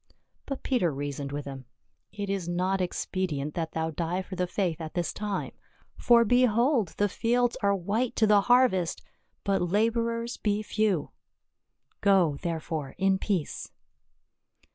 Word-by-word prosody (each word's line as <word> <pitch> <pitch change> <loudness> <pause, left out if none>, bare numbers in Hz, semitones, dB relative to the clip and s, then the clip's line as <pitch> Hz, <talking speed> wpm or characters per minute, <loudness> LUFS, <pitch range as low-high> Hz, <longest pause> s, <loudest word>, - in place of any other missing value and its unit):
But 275 -2 -5
Peter 240 - +1
reasoned 140 0 -4
with 145 0 -4
him, 135 -2 -8 0.3
" - - -49
It 205 -1 -5
is 195 -3 -2
not 185 +2 0
expedient 175 -5 -2
that 165 -2 -3
thou 160 0 -1
die 170 +4 -2
for 185 - -8
the 180 0 -1
faith 175 -3 -1
at 155 -1 -7
this 175 -1 -1
time, 205 -2 -3 0.4
for 235 -1 +5
behold 245 - +3
the 205 - +3
fields 240 +4 +1
are 200 0 +3
white 210 +7 -1
to 220 - +4
the 210 -1 +5
harvest, 245 -8 +3 0.4
but 195 -1 +1
laborers 230 +5 0
be 210 0 0
few. 210 -7 0 0.9
Go, 185 -7 +4
therefore, 160 -4 -3
in 190 0 +2
peace." 190 -8 -2
195 Hz, 145 wpm, -28 LUFS, 165-220 Hz, 0.9 s, for